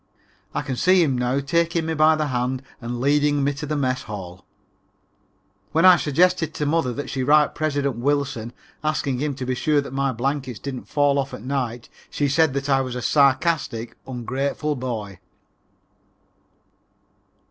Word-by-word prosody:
I - - -1
can 135 -3 -3
see 185 +6 +4
him 135 -5 +1
now 125 +2 0
taking 170 +3 0
me 160 - -1
by 155 0 +5
the 155 -1 -1
hand 125 +1 -1 0.2
and 120 0 -4
leading 145 +2 +2
me 140 +1 +1
to 150 +2 -6
the 150 - -1
mess 130 -3 0
hall. 95 -4 -8 1.3
When 165 +3 +4
I 185 -1 +9
suggested 165 +1 +1
to 150 - -1
mother 145 -3 +1
that 145 +4 -5
she 135 - -3
write 150 +3 +4
President 145 -5 -1
Wilson 135 -3 -1 0.3
asking 145 -4 -1
him 145 0 -2
to 130 -1 -5
be 130 - -1
sure 150 +5 0
to - - +5
see - - -8
that 135 - -9
my 135 0 0
blankets 130 0 -2
didn't 130 +2 -6
fall 145 -1 +2
off 135 0 -3
at - - -11
night, 125 -3 -3 0.2
she 145 - 0
said 145 0 +2
that 140 0 -2
I 135 -1 +3
was 130 -2 -4
a 125 - -3
sarcastic, 135 -2 +1
ungrateful 135 +4 -2
boy. 110 -7 -5
140 Hz, 175 wpm, -23 LUFS, 125-150 Hz, 1.3 s, I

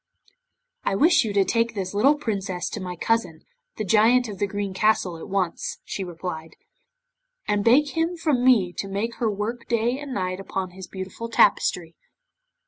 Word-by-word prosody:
'"I 195 - 0
wish 330 - +5
you 220 - -2
to 200 -1 +3
take 230 +1 0
this 190 -2 -3
little 260 +9 +4
Princess 195 - -3
to - - -4
my 180 -1 -5
cousin, 175 -5 -1 0.3
the 215 - -2
Giant 225 +5 +4
of 200 - -8
the 205 - +1
Green 200 -1 -3
Castle, 205 -3 +1
at 165 - -9
once," 190 -3 -2
she 195 - -4
replied, 165 -2 -6 0.9
"and 205 -1 +1
beg 275 +6 +5
him 330 +3 -1
from 295 -7 +1
me 215 -9 +4
to 195 - -2
make 210 +4 -3
her 230 -3 0
work 215 +4 -4
day 235 +2 0
and 290 -2 -7
night 185 -4 -2
upon 190 -1 -4
his 185 0 -10
beautiful 190 +4 -7
tapestry." 180 -6 +2
205 Hz, 175 wpm, -24 LUFS, 185-235 Hz, 0.9 s, wish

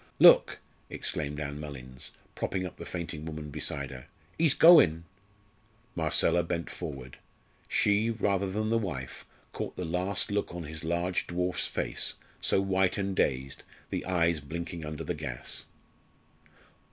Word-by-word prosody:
"Look!" - - +7 0.3
exclaimed 75 0 -2
Ann 70 -1 -4
Mullins, 65 -4 -7 0.2
propping 95 -1 -2
up 90 - -8
the - - -8
fainting 85 -3 -5
woman 75 -2 -6
beside 70 -2 -2
her, 65 -1 -10 0.3
"he's 160 -4 +3
goin'." 155 - +7 0.9
Marcella 80 +1 +3
bent 85 0 -3
forward. 70 -7 -7 0.5
She, 105 +2 +3
rather 100 -3 0
than 110 +3 -1
the 115 - +3
wife, 75 - -5 0.2
caught - - -5
the 90 - -3
last 90 +5 0
look 100 -4 -1
on 90 - -4
his 80 +1 -6
large 85 +2 0
dwarf's 90 +1 0
face, - - 0 0.3
so - - +3
white 95 -1 +2
and 100 -1 -1
dazed, 65 -3 0 0.3
the - - -2
eyes 85 -3 +2
blinking 85 +3 -6
under 75 0 -5
the 90 - -2
gas. 70 -6 -3
85 Hz, 140 wpm, -29 LUFS, 75-95 Hz, 0.9 s, Look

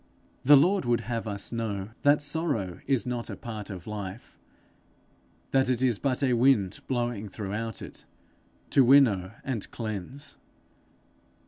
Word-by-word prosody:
The 145 +2 +8
Lord 185 +7 +3
would 120 -2 +1
have 115 0 -4
us 100 -1 -3
know 105 -4 -3
that 145 +1 +4
sorrow 145 - -2
is 135 -4 +1
not 120 -1 -3
a - - -5
part 110 -3 -7
of 95 -4 -7
life; 105 +1 -7 1.2
that 130 -1 +3
it 125 0 +1
is 120 -5 +2
but 135 0 0
a 130 -2 +3
wind 115 -6 +3
blowing 120 -5 -2
throughout 105 +2 -4
it, - - -10 0.7
to 135 - +6
winnow 115 -8 +5
and 125 -6 -3
cleanse. 115 +6 -6
115 Hz, 140 wpm, -28 LUFS, 105-135 Hz, 1.2 s, The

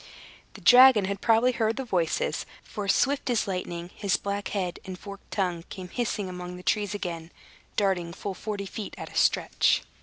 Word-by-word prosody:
The - - -11
dragon 250 -4 +8
had 200 0 -3
probably 230 +2 +4
heard 225 -2 0
the 265 - -4
voices; 175 -8 0 0.2
for 205 -2 -6
swift 270 +7 +2
as 235 -3 +1
lightning, 175 -2 -4
his 200 -3 +1
black 200 0 -3
head 185 -4 -3
and 185 -1 -7
forked 200 +1 -11
tongue 180 -4 -1
came 185 -2 -8
hissing 215 -3 -2
among 180 0 -6
the 180 - -11
trees 205 0 0
again, 170 -4 -5 0.4
darting 190 -4 +1
full 195 +3 -5
forty 205 0 -4
feet 205 +2 -6
at - - -8
a - - -13
stretch. - - +3
200 Hz, 180 wpm, -27 LUFS, 180-215 Hz, 0.4 s, dragon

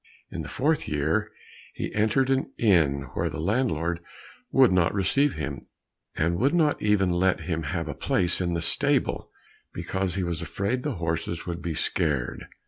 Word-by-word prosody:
In - - -4
the - - -7
fourth 155 +4 0
year, 80 +9 0 0.4
he - - -4
entered 110 +5 +2
an 135 0 0
inn 80 -11 +3
where - - -1
the - - -6
landlord 85 -4 0 0.5
would 130 -5 +5
not 90 0 +2
receive 135 +9 +2
him, 70 -2 -4 0.5
and 85 +2 0
would 140 +7 +2
not 155 -4 +2
even 100 -3 +2
let 90 -1 +2
him 80 0 -2
have 80 +2 -3
a 75 - -3
place 90 +6 0
in 85 -1 0
the 85 - -1
stable, 85 - +2 0.5
because 90 +1 -2
he 95 - -1
was 85 -2 -2
afraid 100 +8 -2
the 145 -2 -3
horses 85 0 -3
would 85 -1 -4
be 85 -2 -3
scared. 70 -6 -1
90 Hz, 170 wpm, -26 LUFS, 80-110 Hz, 0.5 s, would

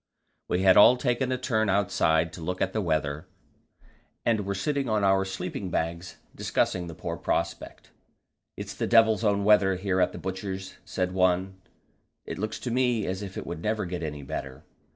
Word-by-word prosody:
We 90 +1 0
had 95 -1 +6
all 125 +4 +8
taken 125 0 0
a 130 - 0
turn 110 -4 0
outside 80 -5 +2
to 85 - -9
look 90 +3 -3
at 95 - 0
the 110 - 0
weather, 80 -2 -1 1.0
and 110 -4 +1
were 100 - -1
sitting 135 +6 -1
on 110 -2 +1
our 95 0 +3
sleeping 95 0 -5
bags 85 +2 -3 0.2
discussing 90 -1 -1
the 85 - -8
poor - - -4
prospect. - - -3 0.7
"It's - - -6
the - - -2
devil's 110 -1 +5
own 100 -2 +2
weather 100 -2 +5
here 95 0 0
at - - +2
the - - -8
Butcher's," 95 0 -5
said 90 -1 -2
one; 95 +1 +1 0.6
"it - - -6
looks 110 +2 -3
to 125 - -3
me 120 -3 +1
as 95 +1 -3
if 95 -2 -7
it - - -5
would 85 -1 -6
never 105 +1 -1
get 90 0 -4
any 75 -3 -5
better. 65 -1 -6
95 Hz, 185 wpm, -27 LUFS, 90-110 Hz, 1.0 s, all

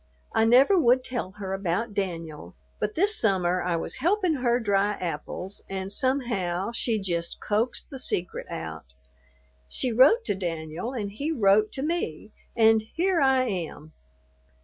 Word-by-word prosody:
I 220 - +3
never 265 - +6
would 255 -2 +4
tell 240 -8 -4
her 195 -2 -5
about 195 +4 -2
Danyul; 165 - -4 0.2
but 210 0 -2
this 405 +5 +3
summer 185 - +1
I 175 -1 0
was 165 - -3
helpin' 355 +1 +1
her 245 -1 +1
dry 205 -2 +1
apples 180 +2 -5
and 195 0 -4
somehow 230 -8 0
she 235 -1 0
jist 170 -3 -2
coaxed 220 +8 -1
the 270 - -6
secret 180 -8 -2
out. 80 -6 -7 0.7
She 250 - -1
wrote 280 - +5
to - - +1
Danyul, 175 +6 -4
and 200 -1 -4
he 285 +10 -3
wrote 215 -5 +3
to 270 - -4
me, 300 - -3 0.2
and 225 -1 +5
here 340 - 0
I 265 -1 +4
am. 170 -8 -5
210 Hz, 150 wpm, -26 LUFS, 180-255 Hz, 0.7 s, never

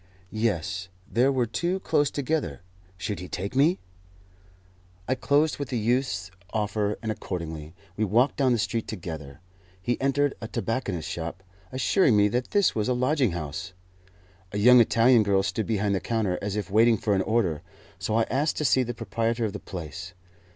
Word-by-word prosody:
Yes, 100 -4 -1 0.2
there 125 +6 +3
were 130 -3 +1
two 175 +11 -1
close 145 -6 +2
together. 150 -1 -2 0.4
Should 95 +3 -3
he 90 - -7
take 100 +7 -5
me? 155 +7 +4 1.3
I 130 - +2
closed 145 +4 +1
with 140 -4 -4
the 125 - -1
youth's 110 -5 0 0.2
offer, 105 -1 -1
and 110 - -1
accordingly 80 -5 -5 0.2
we 110 - 0
walked 115 +7 +3
down 135 -3 +3
the 120 - +3
street 115 +1 -1
together. 80 -7 -7 0.4
He 120 +8 -2
entered 140 +1 +2
a 115 - -4
tobacconist's 105 -9 -2
shop, 85 +3 -5 0.3
assuring 130 - +3
me 105 0 +5
that 125 +4 -1
this 205 -3 +3
was 110 0 -1
a 125 - +2
lodging 130 - +2
house. 85 +3 -5 0.8
A 100 - -3
young 125 +4 +7
Italian 115 +1 +5
girl 100 -2 +2
stood 110 +2 -2
behind 105 -2 +1
the 95 - +1
counter, 110 -5 -1
as 100 0 -3
if 105 -2 -3
waiting 115 +2 +5
for 105 +1 0
an 95 - +2
order; 95 -8 0 0.4
so 110 - -1
I 115 - +4
asked 140 +7 0
to 150 - -1
see 130 -1 +4
the 120 -1 -3
proprietor 115 +1 -1
of 105 - -3
the 105 - -5
place. 90 +1 -7
110 Hz, 180 wpm, -26 LUFS, 95-125 Hz, 1.3 s, young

